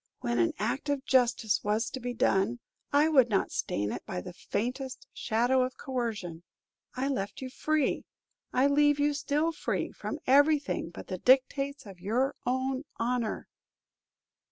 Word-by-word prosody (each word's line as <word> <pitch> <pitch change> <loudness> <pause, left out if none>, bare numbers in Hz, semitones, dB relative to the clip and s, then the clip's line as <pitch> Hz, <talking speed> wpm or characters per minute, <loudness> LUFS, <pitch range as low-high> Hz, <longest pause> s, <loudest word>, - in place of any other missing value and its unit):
When 120 0 0
an 115 - +3
act 245 +8 -2
of 280 -1 -1
justice 245 -4 +2
was 215 +2 0
to 260 - -5
be 245 0 -3
done, 220 -1 +2 0.3
I 290 +2 +5
would 265 -6 +5
not 200 -3 +1
stain 105 +1 -1
it - - -5
by 190 -4 -4
the 180 -1 -8
faintest 250 +8 -4
shadow 245 +3 +2
of 255 0 -2
coercion. 220 - -3 0.5
I 260 +2 -1
left 205 -8 -2
you 260 -1 -6
free, 305 0 0 0.5
I 255 - +3
leave 290 +1 +4
you 290 0 +3
still 295 +3 0
free, 320 - -2
from 295 - -5
everything 285 - +3
but 170 - -9
the 185 -1 -5
dictates 275 +2 +2
of 195 -3 -11
your 245 +9 0
own 260 +1 0
honor." 235 -1 -1
255 Hz, 155 wpm, -29 LUFS, 215-280 Hz, 0.5 s, I